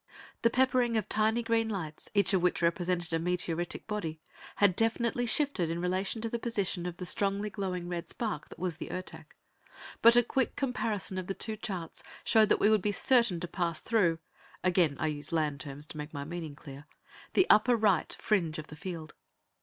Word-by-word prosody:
The 230 - +4
peppering 250 -2 +2
of 215 - -1
tiny 220 +2 +2
green 230 -1 +1
lights, 160 -7 -5
each 200 0 +3
of 190 - +3
which 180 -1 +1
represented 175 0 0
a 165 - +2
meteoritic 175 0 -1
body, 165 -7 -4 0.4
had 200 -3 +4
definitely 235 +3 +1
shifted 230 - +1
in 165 +1 -2
relation 190 +5 -1
to - - 0
the 235 - -2
position 200 -7 -2
of 175 -1 -6
the 180 - -5
strongly 200 +3 0
glowing 185 -4 -3
red 175 -1 -4
spark 225 -3 -3
that - - -12
was 175 -3 -3
the - - -7
Ertak, 185 0 -7 0.7
but 230 +1 +8
a 240 - +6
quick 260 +2 -1
comparison 220 -8 -2
of 180 - -6
the 195 - -3
two 220 -1 -1
charts 185 -6 -5 0.2
showed 220 -1 +4
that - - +3
we 210 - +4
would 215 -2 +4
be 210 - 0
certain 235 -4 +3
to 175 - -3
pass 170 -3 -1
through 190 -8 +2 0.5
again 175 -6 +2
I - - 0
use 145 -2 -3
land 155 -3 0
terms 140 +2 -6
to - - -8
make 150 +1 -7
my 140 - -3
meaning 160 -1 -6
clear 145 0 -11 0.5
the 375 - +5
upper 235 +3 +5
right 210 -6 +2
fringe 175 -7 0
of 155 0 -7
the 155 - -9
field. 160 -1 -7
185 Hz, 200 wpm, -30 LUFS, 165-220 Hz, 0.7 s, but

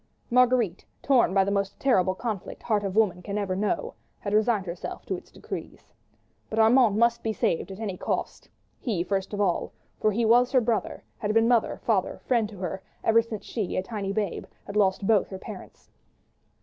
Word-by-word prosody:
Marguerite, 245 -6 +3 0.2
torn 260 -8 +4
by 195 0 +4
the 200 - -1
most 200 0 -1
terrible 190 -9 +2
conflict 215 -3 -5
heart 210 -3 +1
of 195 -1 -3
woman 205 -5 +2
can 200 +2 -4
ever 195 -3 -1
know, 210 - -1 0.2
had 200 - -4
resigned 215 -2 +2
herself 175 0 -6
to - - -2
its - - -11
decrees. - - -8 0.6
But 220 - -4
Armand 225 -1 +5
must 235 +1 +3
be 225 - -1
saved 180 -4 0
at 190 +1 -8
any 200 -5 -4
cost; - - -3 0.3
he, 200 -9 -1
first 195 +1 -2
of 205 - -4
all, 185 -4 0 0.3
for 215 - +2
he 225 +3 0
was 245 +3 +5
her 260 - +6
brother, 230 -2 -1 0.2
had 210 - -1
been 225 0 +5
mother, 235 -2 +2
father, 205 -5 0
friend 230 -4 +2
to 210 - -11
her 185 +1 -4 0.2
ever 225 +1 +5
since 220 -3 -7
she, 215 -6 -3
a 185 - 0
tiny 200 -1 -4
babe, 205 -3 -2 0.2
had 200 - -8
lost 195 -1 +2
both 210 -1 +3
her 190 - -6
parents. - - -11
210 Hz, 195 wpm, -26 LUFS, 195-230 Hz, 0.6 s, her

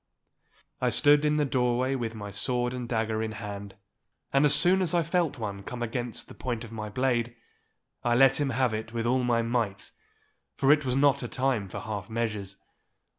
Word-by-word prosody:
I - - +2
stood 145 0 +5
in 150 0 +2
the 150 - +2
doorway 130 -1 +1
with 115 -4 -3
my 105 -1 -7
sword 120 +4 -1
and 125 -2 -5
dagger 110 -1 -1
in 110 -1 -3
hand, 100 -2 -7 0.6
and 140 +2 +4
as 145 0 +6
soon 180 +5 +4
as 175 -2 +1
I 170 - +3
felt 165 -3 0
one 100 -4 -5
come 120 +4 -6
against 120 0 -4
the - - -11
point 120 -3 -4
of 115 - -10
my 110 -2 -5
blade, 120 0 0 0.7
I 120 0 +2
let 135 +2 +5
him 140 - +1
have 130 -1 +1
it 110 +1 -5
with 115 -1 -2
all 125 +1 +2
my 120 -1 +2
might, 115 -5 -2 0.6
for 135 +1 +3
it 150 -1 +3
was 125 -1 0
not 140 0 +3
a 125 - -4
time 130 -5 -1
for - - -6
half 100 -3 -5
measures. 105 -4 -3
120 Hz, 200 wpm, -28 LUFS, 110-135 Hz, 0.7 s, as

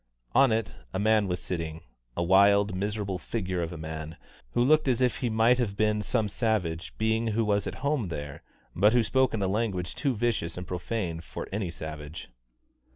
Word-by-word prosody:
On 135 -3 +5
it 110 -1 0 0.2
a - - 0
man 110 0 +3
was 90 -1 -2
sitting, 85 -3 -4 0.4
a 85 - +1
wild, 100 +2 +5
miserable 100 -1 -2
figure 95 -1 -2
of 85 0 -3
a 85 - -6
man, 80 0 -6 0.4
who 120 - +3
looked 155 +3 +4
as 125 -3 +2
if 125 -1 +2
he 125 - -1
might 115 +3 +4
have 100 -5 -1
been 105 -1 +2
some 110 +1 0
savage 95 -6 -1
being 110 +1 +1
who 110 +1 +1
was 105 -1 +1
at - - -4
home 140 -8 +1
there, 75 -4 -6 0.3
but 105 +2 +4
who 120 -1 +4
spoke 130 +4 +2
in 105 -3 -1
a - - +2
language 95 -3 -1
too 140 -4 -1
vicious 105 -8 -1
and 90 - -5
profane 90 -1 -3
for - - -7
any 100 -2 -2
savage. 80 -2 -7
100 Hz, 195 wpm, -28 LUFS, 85-115 Hz, 0.4 s, On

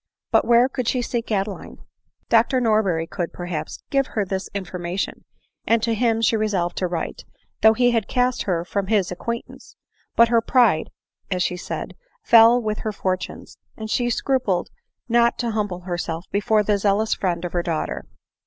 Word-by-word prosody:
But - - +4
where 240 +1 +5
could 255 -3 -4
she 250 0 +1
seek 235 -1 -3
Adeline? 200 -1 -3 0.5
Dr 235 +3 +3
Norberry 215 -8 +1
could, 175 0 -4
perhaps, 175 -3 -5
give 275 -1 +2
her 210 -2 -2
this 190 +1 -4
information; 180 -1 -4 0.4
and 230 -1 +3
to 230 - +1
him 225 0 +1
she 225 - +3
resolved 200 -5 0
to 185 - 0
write 170 -2 -4 0.2
— - - -46
though 220 0 +7
he 245 +1 +3
had 225 -3 0
cast 250 0 +1
her 175 -3 -1
from 195 +1 -2
his 200 -4 +1
acquaintance; 235 +6 -6 0.2
" - - -41
but 235 0 +6
her 230 -1 +4
pride," 225 -9 +3 0.4
as 180 -2 0
she 180 - -1
said, 180 - -6
" - - -41
fell 230 +1 +8
with 215 -2 -3
her 215 - -3
fortunes; 185 -2 -4 0.2
and 220 0 -6
she 240 +1 +1
scrupled 235 -8 0 0.4
not 235 0 +3
to 235 -2 -1
humble 205 -5 -2
herself 175 -1 -4
before 210 +1 +2
the 205 0 +1
zeal 200 0 +2
ous 220 - 0
friend 175 -2 -2
of 175 - -5
her 175 - +1
daughter. 165 -2 -3
215 Hz, 185 wpm, -22 LUFS, 180-235 Hz, 0.5 s, fell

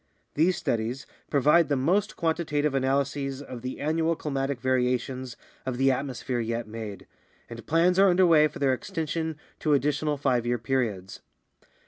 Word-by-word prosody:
These 170 +4 +2
studies 120 +4 -2 0.2
provide 150 +2 +4
the 145 - +2
most 175 +10 +1
quantitative 155 -3 0
analyses 135 0 0
of 130 -4 -8
the 130 +1 -5
annual 160 +2 +1
climatic 135 -3 -2
variations 125 0 -1 0.3
of 130 -2 -3
the 135 +1 +4
atmosphere 130 -2 -3
yet 115 0 -2
made, 110 -3 -7 0.4
and 115 -1 -9
plans 175 +3 +3
are 195 0 +7
under 185 +1 +4
way 155 -3 +6
for - - -10
their 135 -2 +2
extension 160 0 -3 0.2
to 150 -2 +2
additional 150 +1 0
five 130 -4 +1
year 120 0 0
periods. 115 -6 -2
135 Hz, 150 wpm, -27 LUFS, 125-155 Hz, 0.4 s, are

